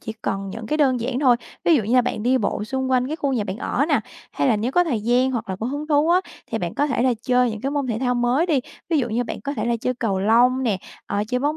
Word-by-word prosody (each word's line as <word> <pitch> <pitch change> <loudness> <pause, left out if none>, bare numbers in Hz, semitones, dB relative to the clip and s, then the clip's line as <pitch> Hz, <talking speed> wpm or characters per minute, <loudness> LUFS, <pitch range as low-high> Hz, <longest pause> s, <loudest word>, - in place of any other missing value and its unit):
chỉ 220 - -6
cần 195 -1 -2
những 220 +2 -7
cái 305 - 0
đơn 265 -5 +2
giản 250 +2 -2
thôi. 250 -4 +5 0.3
Ví 335 - +5
dụ 235 - +1
như 225 +5 0
là 250 - +7
bạn 215 - -3
đi 255 +2 +3
bộ 210 -1 -1
xung 265 +2 -2
quanh 255 0 +2
cái 310 +3 -3
khu 280 -4 -1
nhà 220 -5 0
bạn 190 +1 -4
ở 270 +2 0
nè, 290 -7 +3 0.3
hay 140 - +1
là 215 - +3
nếu 235 +5 -2
có 355 0 +4
thời 250 -10 -1
gian 245 +4 +2
hoặc 235 -4 -3
là 190 - -3
có 220 - -4
hứng 290 +3 -4
thú 300 +1 +3
á 360 +2 +5 0.3
thì - - -3
bạn - - -4
có 290 - +1
thể 255 -4 0
là 255 -2 +3
chơi 250 -1 +2
những 215 -1 -6
cái 275 - -2
môn 285 -2 -1
thể 225 -2 -2
thao 250 -1 0
mới 245 +7 +2
đi. 295 -6 +2 0.3
Ví 315 - +3
dụ 245 -2 0
như 240 +3 -1
bạn - - -6
có 280 0 -4
thể - - -2
là 235 0 +1
chơi 255 - -1
cầu 215 -5 -1
lông 245 +5 +4
nè, 210 -6 0 0.3
ờ, 205 0 -1
chơi 250 - 0
bóng 295 +2 0
250 Hz, 315 wpm, -22 LUFS, 225-275 Hz, 0.3 s, là